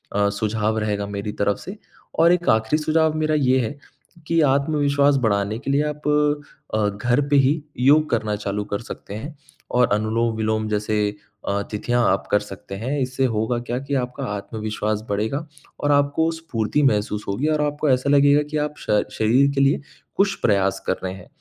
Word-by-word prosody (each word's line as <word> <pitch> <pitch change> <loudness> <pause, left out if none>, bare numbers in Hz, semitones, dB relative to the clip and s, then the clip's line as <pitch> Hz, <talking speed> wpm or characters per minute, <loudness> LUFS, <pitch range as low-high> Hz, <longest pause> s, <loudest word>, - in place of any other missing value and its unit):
अ, 100 0 +3
सुझाव 110 +1 -1
रहेगा 105 -1 -2
मेरी 100 +1 -4
तरफ़ 100 0 +2
से 195 +3 -8 0.4
और 170 +1 +6
एक 175 0 0
आखिरी 110 +8 +2
सुझाव 160 0 +2
मेरा 155 0 +1
ये 130 -2 +3
है 145 +6 -6 0.5
कि 165 0 +2
आत्मविश्वास 140 0 +2
बढ़ाने 100 0 +1
के 140 - -3
लिए 145 +2 +2
आप 150 0 -7 0.7
अ, 105 -1 +2
घर 120 +7 0
पे 145 - +3
ही 140 +3 +3 0.2
योग 150 +4 +4
करना 110 -2 0
चालू 105 0 -3
कर 100 0 -3
सकते 100 - -9
हैं 145 +7 -7 0.3
और 125 -1 +4
अनुलोम-विलोम 110 0 0
जैसे 105 0 -1 0.5
अ, 100 0 0
तिथियाँ 120 +3 0
आप - - -1
कर 105 - +4
सकते 100 -1 -9
हैं 130 +8 -2
इससे 130 +1 0
होगा 110 +3 0
क्या 120 0 -4
कि 140 +1 -6
आपका 125 -1 -3
आत्मविश्वास 105 0 -3
बढ़ेगा 110 +10 -1 0.4
और 145 - +2
आपको 145 +3 +2
स्फूर्ति 150 -4 -1
महसूस 105 -4 +1
होगी 105 +10 -1
और 155 -1 +1
आपको 150 0 -1
ऐसा 130 +1 +2
लगेगा 145 +1 +5
कि 155 - -1
आप 150 0 -1
श 105 -1 +1 0.2
शरीर 125 +6 +3
के 135 - +2
लिए 140 +1 +3 0.3
कुछ 195 0 +2
प्रयास 100 -3 +2
कर 95 - +2
रहे 95 0 -3
हैं। 95 -1 -12
120 Hz, 180 wpm, -22 LUFS, 105-145 Hz, 0.7 s, और